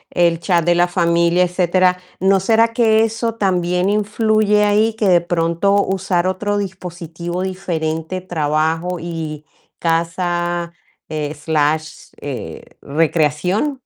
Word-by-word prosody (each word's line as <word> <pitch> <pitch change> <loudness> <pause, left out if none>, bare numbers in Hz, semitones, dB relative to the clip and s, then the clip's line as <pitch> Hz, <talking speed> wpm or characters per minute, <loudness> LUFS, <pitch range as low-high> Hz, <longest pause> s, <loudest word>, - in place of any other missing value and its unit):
el 170 -2 +3
chat 170 0 +1
de 175 +1 +2
la 175 +1 +3
familia, 170 0 +2
etcétera, 180 0 +2 0.2
¿no 190 +1 +3
será 225 +4 +3
que 225 -2 +3
eso 225 +1 -1
también 180 -2 0
influye 210 0 +2
ahí? 215 +2 +2
Que 215 -3 0
de 175 -1 +5
pronto 170 +4 +1
usar 185 -2 0
otro 205 +2 -1
dispositivo 175 -2 -5
diferente, 175 -2 -3
trabajo 160 +1 -1
y 160 -3 -5 0.4
casa, 175 +1 -1 0.4
eh, 150 -1 -3
slash, 155 +1 -1
eh, 120 - -6 0.2
recreación. 165 - +1
175 Hz, 115 wpm, -18 LUFS, 165-195 Hz, 0.4 s, de